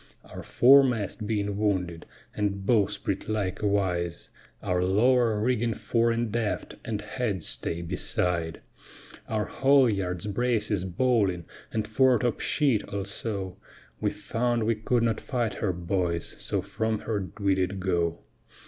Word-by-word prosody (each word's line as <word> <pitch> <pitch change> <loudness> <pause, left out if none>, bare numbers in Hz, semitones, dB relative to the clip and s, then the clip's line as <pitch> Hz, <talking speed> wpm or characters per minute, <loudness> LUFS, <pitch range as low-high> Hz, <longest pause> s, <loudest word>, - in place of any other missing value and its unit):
Our - - -9
foremast 125 -5 +4
being 105 -2 -1
wounded, 90 -5 -1 0.3
and 100 -2 -1
bowsprit 100 -3 0
likewise; 95 -4 -1 0.3
Our 90 0 +1
lower 115 +3 +3
rigging 115 0 +1
fore 115 +2 +1
and 115 -1 -1
aft, 110 -3 -2
and 105 -2 -3
headstay 100 -6 -3
beside; 85 -1 -1 0.7
Our 110 -2 0
haulyards, 105 -10 +2
braces, 105 -3 0
bowling, 95 -3 +1 0.3
and 110 -1 -1
foretop 125 +1 +3
sheet 135 -8 +2
also, 100 -1 -4 0.4
We - - +1
found 120 0 -1
we 115 +1 +2
could 115 +2 0
not 115 -2 0
fight 120 -4 -1
her, 100 - -1
boys, 85 -1 -2
so - - -1
from 110 -1 -2
her 100 -5 -3
we 100 -1 +3
did 95 +1 -1
go. 85 -3 0
105 Hz, 120 wpm, -27 LUFS, 95-115 Hz, 0.7 s, foremast